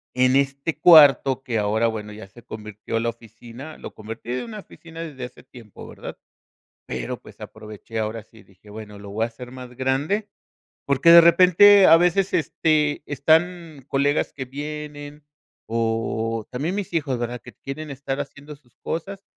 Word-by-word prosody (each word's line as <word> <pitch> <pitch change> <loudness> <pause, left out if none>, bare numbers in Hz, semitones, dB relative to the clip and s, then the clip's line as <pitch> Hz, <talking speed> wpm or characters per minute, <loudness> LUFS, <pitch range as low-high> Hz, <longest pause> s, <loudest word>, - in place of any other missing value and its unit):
en 130 +1 +3
este 140 +3 -1
cuarto 140 -5 +6
que, 115 -3 -2
ahora, 110 +3 +1
bueno, 105 -2 -5
ya 105 -2 -11
se 120 +4 -17
convirtió 110 +1 -6
en 115 - -1
la 115 - 0
oficina, 115 +5 -11
lo - - -10
convertí 115 +2 -8
en 125 - -3
una 215 -2 -8
oficina 165 -3 -12
desde 140 -6 -7
hace 125 - -13
tiempo, 120 -5 -13
¿verdad? - - -9 0.7
Pero 65 -1 -5
pues, - - -16
aproveché, 110 +1 -9
ahora 110 0 -3
sí 110 -1 -19
dije: 95 +2 -20
"Bueno, 105 -1 -10
lo 100 0 -10
voy 110 +3 -1
a - - 0
hacer 125 +2 -11
más 125 -1 -10
grande", 145 +11 -1 0.6
porque, 140 +4 +3
de 170 - +11
repente, 185 +3 +7
a 165 - +8
veces, 180 +2 +1
este, 155 -2 +1
están 160 +1 0
colegas 140 +2 0
que 130 -2 -6
vienen 145 +1 -8 0.4
o 115 -1 -2
también 150 +9 -3
mis 200 -4 -5
hijos, 140 -6 -1
¿verdad?, 120 0 -4
que - - -13
quieren 150 +3 -8
estar 135 0 -5
haciendo 145 +1 -10
sus 130 -4 -30
cosas 195 +4 -6
135 Hz, 170 wpm, -23 LUFS, 115-155 Hz, 0.7 s, de